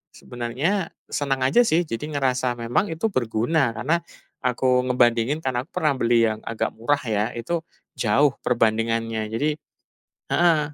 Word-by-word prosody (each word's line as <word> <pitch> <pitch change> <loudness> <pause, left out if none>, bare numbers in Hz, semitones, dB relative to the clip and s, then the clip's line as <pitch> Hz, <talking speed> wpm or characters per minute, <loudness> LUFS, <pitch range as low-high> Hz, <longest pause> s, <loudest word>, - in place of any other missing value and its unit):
sebenarnya 140 +11 -2 0.2
seneng 140 -2 0
aja, 185 - +5
sih. 170 -1 +3
Jadi 150 +5 -4
ngerasa 130 -2 +1
memang, 120 - 0
itu 160 +7 -1
berguna. 120 - +1
Karena 140 +10 +1 0.4
aku 125 0 +2
ngebandingin, 120 +3 +2
karena 125 -2 -1
aku - - -52
pernah 155 -6 +1
beli 115 -1 +4
yang 110 -1 -2
agak 115 - -2
murah, 130 +6 +1
ya. 105 0 0
Itu, 160 +9 -3 0.3
jauh 135 +6 +2
perbandingannya. 115 -1 0
Jadi 150 +7 0 0.8
heeh. 170 -2 +4
125 Hz, 140 wpm, -23 LUFS, 115-150 Hz, 0.8 s, aja